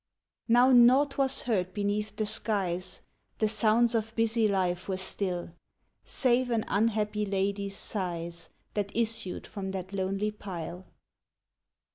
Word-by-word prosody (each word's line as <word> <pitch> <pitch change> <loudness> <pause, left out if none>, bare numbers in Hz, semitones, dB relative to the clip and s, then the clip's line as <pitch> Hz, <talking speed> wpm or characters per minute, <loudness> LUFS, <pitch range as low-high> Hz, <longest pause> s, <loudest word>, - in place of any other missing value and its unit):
Now 245 +3 +5
naught 260 +4 +5
was 270 0 +3
heard 185 -6 -1
beneath 205 0 -1
the 215 - -1
skies, 190 -4 -2 0.3
The 215 - +2
sounds 225 +2 +3
of 225 0 -1
busy 225 0 +2
life 185 -3 0
were 190 - -1
still, 185 -2 -3 0.5
Save 250 -1 +3
an 230 -2 0
unhappy 210 0 +1
lady's 200 0 -1
sighs, 170 -4 -4 0.2
That 205 -1 -3
issued 225 -5 -1
from 195 -2 -6
that 190 0 -6
lonely 195 +2 -1
pile. 180 -3 -7
205 Hz, 125 wpm, -29 LUFS, 190-225 Hz, 0.5 s, Now